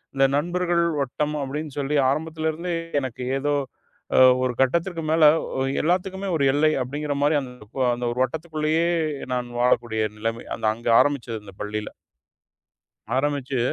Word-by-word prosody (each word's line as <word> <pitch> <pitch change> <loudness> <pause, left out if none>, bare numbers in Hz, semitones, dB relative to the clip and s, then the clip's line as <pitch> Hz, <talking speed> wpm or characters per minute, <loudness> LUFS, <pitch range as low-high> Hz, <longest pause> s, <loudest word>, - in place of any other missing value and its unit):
இந்த 135 - +4
நண்பர்கள் 175 +2 0 0.2
வட்டம் 150 +3 -2
அப்பிடின்னு 145 +1 -5
சொல்லி 145 +2 0
ஆரம்பத்திலேருந்தே, 160 +3 -2 0.3
எனக்கு 130 -1 -5 0.2
ஏதோ 145 +1 0 0.6
அ - - +7 0.2
ஒரு 125 -1 0
கட்டத்திற்கு 165 +6 +1
மேல, 160 0 +3 0.6
எல்லாத்துக்குமே 190 +3 -1
ஒரு 140 - 0
எல்லை 155 +2 +4
அப்பிடிங்கிற 145 +3 -3
மாரி 150 +1 +3
அந்த, 125 -2 -8 0.4
அந்த 120 - -4
ஒரு 125 - -5
வட்டத்துக்குள்ளேயே 160 +3 -1 0.5
நான் 125 -1 -2
வாழக்கூடிய 120 -3 +2 0.2
நிலைமை. 115 +2 -3
அந்த - - -5
அங்க 115 +1 -9
ஆரம்பிச்சது 125 -6 +1
அந்த 100 -2 -12
பள்ளியில. 105 0 -3 1.3
ஆரம்பிச்சு 140 -1 -1
145 Hz, 130 wpm, -24 LUFS, 125-160 Hz, 1.3 s, அ